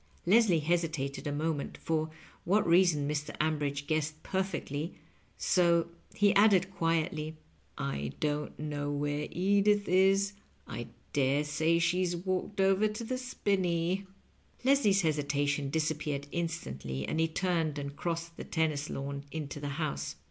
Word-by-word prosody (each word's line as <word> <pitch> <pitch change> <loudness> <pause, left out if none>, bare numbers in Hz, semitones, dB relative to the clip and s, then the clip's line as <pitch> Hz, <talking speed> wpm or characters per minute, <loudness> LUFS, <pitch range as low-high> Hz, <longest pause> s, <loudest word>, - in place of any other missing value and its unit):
Leslie 190 -3 +5
hesitated 155 -4 -1
a - - -1
moment, 150 0 -2
for 160 -1 -1 0.3
what 200 +5 +3
reason 170 -4 +4
Mr. 150 0 -3
Ambridge 145 -2 0
guessed 155 0 -1
perfectly, 185 -5 -2 0.4
so 170 -2 +3 0.3
he 205 -1 +4
added 195 -2 +5
quietly, 160 -2 0 0.2
" - - -37 0.2
I 70 0 -4
don't 150 0 -2
know 145 -1 -3
where 145 +1 -1
Edith 200 +2 +2
is; 195 +2 +4 0.3
I 120 - -5 0.3
dare 140 +1 +2
say 155 +3 +2
she's 175 +1 +1
walked 185 +3 -2
over 195 +2 +4
to 215 +2 -5
the 255 +3 -2
spin 205 -6 0
ney." 175 +2 0 0.6
Leslie's 250 -7 +4
hesitation 145 -3 0
disappeared 155 -2 -1
instantly, 70 - -3
and 160 - -1
he 165 - +3
turned 165 -3 0
and 140 0 -5
crossed 170 0 -3
the - - -5
tennis 155 -3 -1
lawn 140 0 -4
into 150 -2 -5
the 145 0 -4
house. 155 - -2
160 Hz, 140 wpm, -31 LUFS, 145-185 Hz, 0.6 s, Leslie